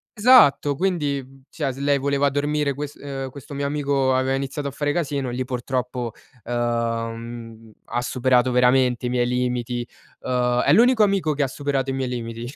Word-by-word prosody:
Esatto, 205 Hz, -, +5 dB
quindi, 140 Hz, -6 st, -2 dB
cioè, 140 Hz, -4 st, -3 dB
se 135 Hz, -, -11 dB
lei 140 Hz, 0 st, +2 dB
voleva 140 Hz, +1 st, +1 dB
dormire 145 Hz, 0 st, 0 dB
quest 145 Hz, +1 st, -6 dB
uhm, 135 Hz, -2 st, -5 dB
questo 140 Hz, +1 st, -11 dB
mio 140 Hz, 0 st, -2 dB
amico 140 Hz, -2 st, +1 dB
aveva 130 Hz, +1 st, +1 dB
iniziato 140 Hz, +2 st, -3 dB
a -, -, -4 dB
fare 145 Hz, +1 st, -1 dB
casino 140 Hz, -5 st, -2 dB
e -, -, -5 dB
lì, 130 Hz, +1 st, -2 dB
purtroppo, 125 Hz, -1 st, -3 dB, 0.3 s
uhm, 115 Hz, -1 st, -3 dB
ha 120 Hz, -, -2 dB
superato 125 Hz, 0 st, +2 dB
veramente 125 Hz, 0 st, +3 dB
i -, -, -2 dB
miei 120 Hz, -1 st, +1 dB
limiti, 125 Hz, -1 st, -2 dB, 0.3 s
uhm 125 Hz, -1 st, 0 dB, 0.2 s
è 140 Hz, -, +3 dB
l'unico 235 Hz, +1 st, +5 dB
amico 195 Hz, -6 st, +1 dB
che 145 Hz, -, +1 dB
ha -, -, +1 dB
superato 135 Hz, 0 st, -2 dB
i -, -, -2 dB
miei 130 Hz, -1 st, -2 dB
limiti, 115 Hz, 0 st, -5 dB
135 Hz, 175 wpm, -23 LUFS, 125-145 Hz, 0.3 s, Esatto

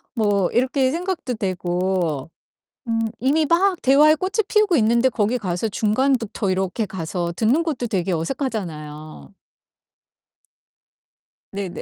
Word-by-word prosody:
뭐 205 Hz, -4 st, +1 dB
이렇게 260 Hz, +1 st, +2 dB
생각도 340 Hz, -6 st, -3 dB
되고 180 Hz, -5 st, -1 dB, 0.6 s
음 225 Hz, 0 st, 0 dB, 0.2 s
이미 295 Hz, +4 st, +2 dB
막 360 Hz, +2 st, +2 dB
대화에 295 Hz, +4 st, +6 dB
꽃을 385 Hz, +5 st, -1 dB
피우고 425 Hz, -4 st, +3 dB
있는데 235 Hz, +2 st, +3 dB
거기 225 Hz, +1 st, 0 dB
가서 185 Hz, +1 st, -2 dB
중간부터 225 Hz, -1 st, 0 dB
이렇게 190 Hz, +3 st, -1 dB
가서 170 Hz, -1 st, -4 dB
듣는 245 Hz, +9 st, +2 dB
것도 265 Hz, -7 st, -2 dB
되게 185 Hz, -2 st, -1 dB
어색하잖아요. 155 Hz, -, -5 dB, 2.2 s
네네. 195 Hz, -3 st, -5 dB
220 Hz, 260 characters per minute, -22 LUFS, 180-275 Hz, 2.2 s, 대화에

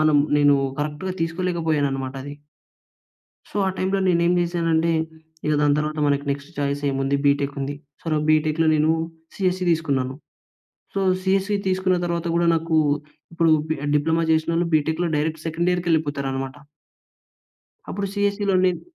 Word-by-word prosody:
మనం 155 Hz, -1 st, +4 dB, 0.2 s
నేను 145 Hz, -1 st, +5 dB, 0.2 s
కరెక్ట్‌గా 150 Hz, +5 st, -3 dB
తీసుకోలేకపోయాననమాట 160 Hz, -6 st, -1 dB
అది. 145 Hz, +1 st, -7 dB, 1.2 s
సో, -, -, -21 dB
ఆ -, -, +2 dB
టైమ్‌లో 190 Hz, +1 st, 0 dB
నేనేమి 170 Hz, 0 st, +3 dB
జెసానంటే, 170 Hz, -1 st, +1 dB, 0.6 s
ఇగ 155 Hz, -, +2 dB
దాని 145 Hz, -1 st, +3 dB
తరువాత 155 Hz, 0 st, -2 dB
మనకి 140 Hz, 0 st, +1 dB
నెక్స్ట్ 140 Hz, +2 st, -4 dB
చాయిస్ 140 Hz, 0 st, -1 dB
ఏముంది 135 Hz, +1 st, 0 dB
బి‌టెక్ 140 Hz, 0 st, +2 dB
ఉంది. 140 Hz, +1 st, -3 dB, 0.3 s
సొ, -, -, -27 dB
నాకు 150 Hz, 0 st, 0 dB
బి‌టెక్‌లో 155 Hz, +1 st, +2 dB
నేను 155 Hz, +1 st, +3 dB, 0.5 s
సీఎస్‌సి 185 Hz, -1 st, 0 dB
తీసుకున్నాను. 140 Hz, -6 st, 0 dB, 0.8 s
సో, 195 Hz, -, -1 dB, 0.2 s
సీఎస్‌సి 195 Hz, +2 st, +1 dB
తీసుకున్న 185 Hz, -1 st, +1 dB
తరువాత 170 Hz, 0 st, -2 dB
కూడా 170 Hz, 0 st, +2 dB
నాకు, 165 Hz, 0 st, 0 dB, 0.6 s
ఇప్పుడు 165 Hz, -1 st, +3 dB, 0.2 s
పి 160 Hz, -, +1 dB, 0.2 s
డిప్లొమా 160 Hz, +3 st, +2 dB
చేసినోళ్ళు 165 Hz, +2 st, +1 dB
బి‌టెక్‌లో 160 Hz, +3 st, 0 dB
డైరెక్ట్ 155 Hz, +1 st, -2 dB
సెకండీయర్‌కెళ్ళిపోతారనమాట. 155 Hz, -6 st, -1 dB, 1.4 s
అప్పుడు 200 Hz, +1 st, -2 dB
సీఎస్‌సి‌లో 205 Hz, -1 st, +1 dB
నెన్ 180 Hz, -2 st, +1 dB
160 Hz, 130 wpm, -23 LUFS, 145-175 Hz, 1.4 s, నేను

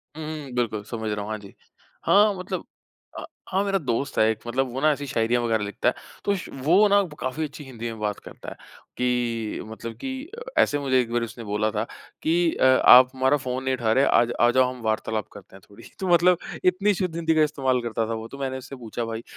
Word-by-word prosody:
हुँ, 160 Hz, -, -6 dB
हुँ, 150 Hz, -3 st, -6 dB
बिल्कुल, 110 Hz, -4 st, -1 dB
समझ 110 Hz, 0 st, -5 dB
रहा 105 Hz, 0 st, -2 dB
हूँ, 100 Hz, -, -6 dB
हाँ 110 Hz, -, -2 dB
जी। 100 Hz, -2 st, -13 dB, 0.5 s
हाँ 210 Hz, +1 st, +5 dB
मतलब 185 Hz, -, -5 dB, 0.5 s
अ, -, -, -7 dB, 0.3 s
हाँ 190 Hz, +1 st, +1 dB
मेरा 195 Hz, -1 st, +1 dB
दोस्त 135 Hz, -2 st, -2 dB
है 110 Hz, -, +5 dB
एक 110 Hz, -, -1 dB
मतलब 130 Hz, +2 st, 0 dB
वो 135 Hz, -, -3 dB
ना 155 Hz, +1 st, +5 dB
ऐसी 145 Hz, -1 st, -3 dB
शायरियाँ 120 Hz, -2 st, +1 dB
वगैरह 110 Hz, -2 st, +1 dB
लिखता 100 Hz, -, 0 dB
है। -, -, -2 dB, 0.3 s
तो 200 Hz, -, +2 dB
श 185 Hz, -, -7 dB
वो 185 Hz, +8 st, +5 dB
ना 200 Hz, 0 st, +5 dB, 0.2 s
काफ़ी 130 Hz, +5 st, -2 dB
अच्छी 150 Hz, 0 st, -7 dB
हिंदी 120 Hz, -4 st, -9 dB
में 110 Hz, -, -9 dB
बात 105 Hz, -1 st, -2 dB
करता -, -, -10 dB
है, -, -, -10 dB, 0.4 s
कि 120 Hz, -3 st, -1 dB
मतलब 110 Hz, +1 st, -7 dB
की, 265 Hz, +3 st, -6 dB, 0.3 s
ऐसे 145 Hz, -, +3 dB
मुझे 130 Hz, -2 st, +2 dB
एक 115 Hz, -2 st, -5 dB
बार 120 Hz, 0 st, +1 dB
उसने 115 Hz, +1 st, -7 dB
बोला 105 Hz, 0 st, 0 dB
था 105 Hz, 0 st, -1 dB, 0.4 s
कि 160 Hz, -, +2 dB, 0.2 s
अ, -, -, -1 dB
आप 130 Hz, -1 st, +8 dB
हमारा 130 Hz, +2 st, +2 dB
फ़ोन 130 Hz, -1 st, -4 dB
नहीं 130 Hz, 0 st, 0 dB
उठा 115 Hz, -3 st, 0 dB
रहे 135 Hz, +4 st, +4 dB
आज 120 Hz, 0 st, +3 dB
आ 120 Hz, -, +6 dB
जाओ 130 Hz, 0 st, +3 dB
हम 125 Hz, -, -12 dB
वार्तालाप 110 Hz, 0 st, -1 dB
करते 100 Hz, -2 st, -14 dB
हैं 95 Hz, -, -14 dB
थोड़ी। 100 Hz, +3 st, -15 dB, 0.2 s
तो 190 Hz, -, -2 dB
मतलब 175 Hz, 0 st, +5 dB, 0.3 s
इतनी 195 Hz, +3 st, +3 dB
शुद्ध 180 Hz, -3 st, -2 dB
हिंदी 165 Hz, -1 st, +1 dB
का 155 Hz, -, +4 dB
इस्तेमाल 130 Hz, -4 st, 0 dB
करता 115 Hz, -1 st, -2 dB
था -, -, -1 dB
वो 110 Hz, 0 st, -5 dB
तो 140 Hz, -, -10 dB
मैंने 130 Hz, -1 st, -3 dB
उससे 130 Hz, +1 st, -9 dB
पूछा 120 Hz, -1 st, -5 dB
भाई, 115 Hz, 0 st, -5 dB
130 Hz, 235 wpm, -24 LUFS, 115-155 Hz, 0.5 s, आप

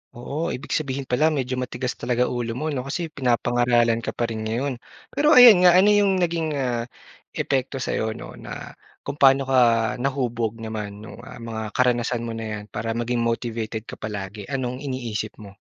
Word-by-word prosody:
Oo, 145 Hz, +7 st, -3 dB
ibig 125 Hz, -, -9 dB
sabihin 140 Hz, -2 st, -1 dB
pala 130 Hz, +4 st, +2 dB
medyo 130 Hz, -5 st, -1 dB
matigas 125 Hz, 0 st, -3 dB
talaga 125 Hz, +1 st, 0 dB
ulo 120 Hz, -2 st, -3 dB
mo 155 Hz, +5 st, -2 dB
'no 130 Hz, -2 st, -3 dB
kasi 165 Hz, +3 st, -3 dB
pinapangaralan 120 Hz, -3 st, +2 dB
ka -, -, -5 dB
pa -, -, -1 dB
rin 110 Hz, -, -4 dB
ngayon. 125 Hz, +3 st, -2 dB, 0.3 s
Pero 300 Hz, +2 st, +4 dB
ayan 220 Hz, -8 st, +9 dB
nga 175 Hz, -, +7 dB
ano 195 Hz, +3 st, +6 dB
yung 205 Hz, -2 st, +4 dB
naging, 165 Hz, -3 st, -1 dB
ah, 120 Hz, -4 st, -1 dB, 0.5 s
epekto 135 Hz, 0 st, -1 dB
sa'yo 110 Hz, -4 st, -2 dB
'no, -, -, -9 dB
na -, -, -8 dB, 0.3 s
kung 145 Hz, -, -6 dB
pa'no 135 Hz, 0 st, +6 dB
ka 130 Hz, -1 st, +2 dB, 0.4 s
nahubog 120 Hz, -4 st, -2 dB
naman 105 Hz, -2 st, -6 dB
nung, 110 Hz, -, -11 dB
ah, -, -, -10 dB
mga 110 Hz, -2 st, -5 dB
karanasan 120 Hz, -1 st, +1 dB
mo 115 Hz, -, -4 dB
na 115 Hz, 0 st, -5 dB
'yan 105 Hz, -, -7 dB
para 115 Hz, 0 st, -3 dB
maging 120 Hz, +1 st, -1 dB
motivated 115 Hz, -2 st, -2 dB
ka -, -, -10 dB
palagi? 100 Hz, -1 st, -6 dB
Anong 130 Hz, -2 st, -3 dB
iniisip 120 Hz, -6 st, -4 dB
mo? 100 Hz, -2 st, -13 dB
125 Hz, 180 wpm, -23 LUFS, 115-140 Hz, 0.5 s, ayan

